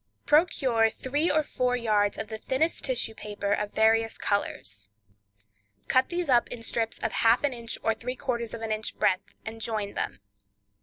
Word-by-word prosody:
Procure 265 -8 +3
three 285 +8 -1
or 310 +1 +3
four 250 -3 0
yards 210 -4 +1
of 220 - -4
the 220 0 -6
thinnest 300 +9 0
tissue 255 -4 +1
paper 205 -2 -4
of 210 0 -2
various 225 +1 +2
colors. 100 - -2 1.0
Cut 260 0 +3
these 350 -1 -2
up 245 -3 +3
in 235 -2 -7
strips 225 0 -1
of 225 - 0
half 230 +4 +4
an 285 -2 +1
inch 235 -1 -3
or 225 - +2
three 245 +3 -5
quarters 235 -4 -3
of 225 - -8
an 220 - -3
inch 215 0 -3
breadth, 195 +1 0
and 225 +1 -7
join 215 -3 -2
them. - - -3
225 Hz, 175 wpm, -27 LUFS, 215-255 Hz, 1.0 s, half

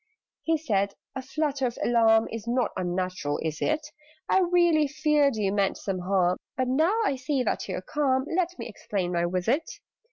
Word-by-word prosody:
He 325 0 +1
said 200 -9 -1 0.2
"A 265 - -4
flutter 275 -1 -1
of 240 - -6
alarm 225 -2 +4
Is 225 0 -6
not 240 -1 +1
unnatural, 180 -4 -2
is 155 -1 -3
it? 310 0 0 0.4
I - - +4
really 345 -4 +3
feared 295 -2 +2
you 205 -3 0
meant 200 -2 +1
some 195 -2 -3
harm: 180 -1 +1 0.2
But, 255 -1 0
now 320 - +2
I 280 - +1
see 260 0 -1
that 215 - -2
you 185 - -2
are - - -5
calm, 265 +1 0
Let 360 0 0
me - - -6
explain 195 -4 -3
my 170 -1 +1
visit. 185 - -1
245 Hz, 185 wpm, -26 LUFS, 195-300 Hz, 0.4 s, alarm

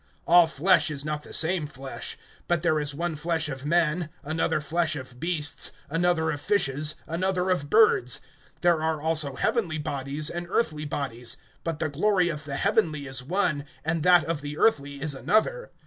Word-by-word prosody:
(39)All 170 -1 +6
flesh 175 +3 +3
is 145 -1 -4
not 150 -1 -2
the - - -13
same 165 -1 +1
flesh; 135 -2 -6 0.3
but 175 -2 0
there 155 -3 +2
is 145 -1 -2
one 170 +1 -2
flesh 160 +1 -1
of 135 0 -6
men, 170 0 +1
another 155 +1 0
flesh 160 +2 0
of 130 -3 -9
beasts, 155 -3 0 0.2
another 165 -1 +1
of 145 -1 -5
fishes, 155 -6 +1
another 185 +2 -1
of 145 -6 -1
birds. 210 - +4 0.4
(40)There 170 -2 +4
are 160 -1 0
also 155 -3 +1
heavenly 175 - 0
bodies, 145 0 -2
and 175 0 -5
earthly 155 -8 0
bodies; 130 -5 -3 0.3
but 165 -2 -2
the 155 - -1
glory 180 +4 +2
of 150 -2 -5
the 140 -2 -4
heavenly 165 -6 +1
is 130 -1 -3
one, 160 -2 0 0.2
and 160 0 0
that 175 0 +6
of 165 -3 -3
the 145 +1 -6
earthly 140 -9 +1
is 150 +1 +1
another. - - 0
155 Hz, 180 wpm, -26 LUFS, 145-175 Hz, 0.4 s, 39)All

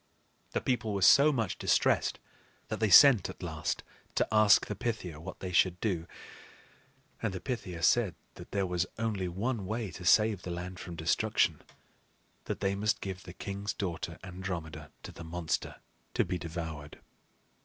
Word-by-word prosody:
The - - 0
people 120 -5 -1
were 100 - 0
so 140 +10 +7
much 115 -8 -2
distressed - - +2 0.5
that - - -3
they 110 -1 +2
sent 120 +1 +8
at - - -9
last - - -3 0.3
to - - +2
ask 110 -2 +6
the - - -4
Pythia 110 - -4
what 80 - -9
they 95 - -4
should 90 0 +3
do; 90 -6 -1 1.1
and 115 - -1
the 95 - -4
Pythia 90 -10 -5
said 105 -2 +3 0.2
that - - -12
there 100 -1 0
was 90 0 -1
only 110 -5 -1
one 100 +3 -2
way 110 -2 -3
to 90 - -9
save 105 +2 +4
the 90 - -7
land 90 +1 -5
from 85 - -7
destruction, 80 0 +1 0.8
that - - -4
they 95 0 +1
must 105 +1 0
give 95 -1 -5
the 90 - -9
king's 100 +1 -4
daughter, 85 -2 -4
Andromeda, 85 -5 -6
to - - -8
the 85 - -10
monster 80 0 -3 0.4
to - - +3
be 90 - -3
devoured. 80 -3 -6
95 Hz, 165 wpm, -31 LUFS, 85-110 Hz, 1.1 s, sent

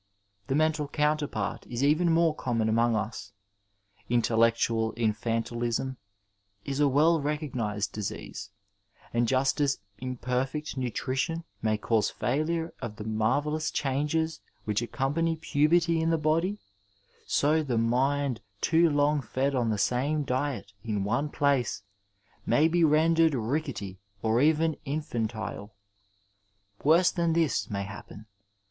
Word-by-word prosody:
The 135 - 0
mental 155 -1 +1
counterpart 150 -8 -1
is 120 +2 -3
even 155 +4 +3
more 165 -1 +3
conmion 115 -6 -1
among 115 +1 +2
us. 105 +2 -4 0.8
Intellectual 115 -1 +2
infantilism 115 +3 -1 0.7
is 140 0 -3
a 145 - +5
well 155 +4 +3
recognized 125 -9 -2
disease, 105 -2 -6 0.6
and 120 0 +2
just 135 +3 +1
as 140 -1 +2 0.2
imperfect 130 +4 -3
nutrition 130 +6 -2 0.2
may 110 -1 +1
cause 110 -1 +1
failure 160 +5 -1
of 115 -4 -5
the 105 - -7
marvellous 145 +9 0
changes 150 +3 -1 0.2
which 105 +1 0
accompany 145 +7 0
puberty 165 +2 +2
in 165 - +1
the 165 - +2
body, 165 +6 +1 0.7
so 155 +2 +2
the 130 -6 -1
mind 130 +2 +1 0.2
too 165 +6 +4
long 145 0 +2
fed 135 +3 -1
on 120 -3 +1
the 110 - 0
same 135 +8 +1
diet 130 -5 -2
in 105 -4 -1
one 120 +9 0
place 140 -8 0 0.6
may 155 +2 +3
be 170 +1 +2
rendered 160 0 +4
rickety 115 - -3 0.2
or 115 +2 +2
even 160 +1 +3
infantile. 110 -7 -4 1.1
Worse 165 +5 +5
than 170 -2 0
this 165 -4 +1
may 100 -2 -2
happen. 105 +1 -10
135 Hz, 125 wpm, -28 LUFS, 115-155 Hz, 1.1 s, a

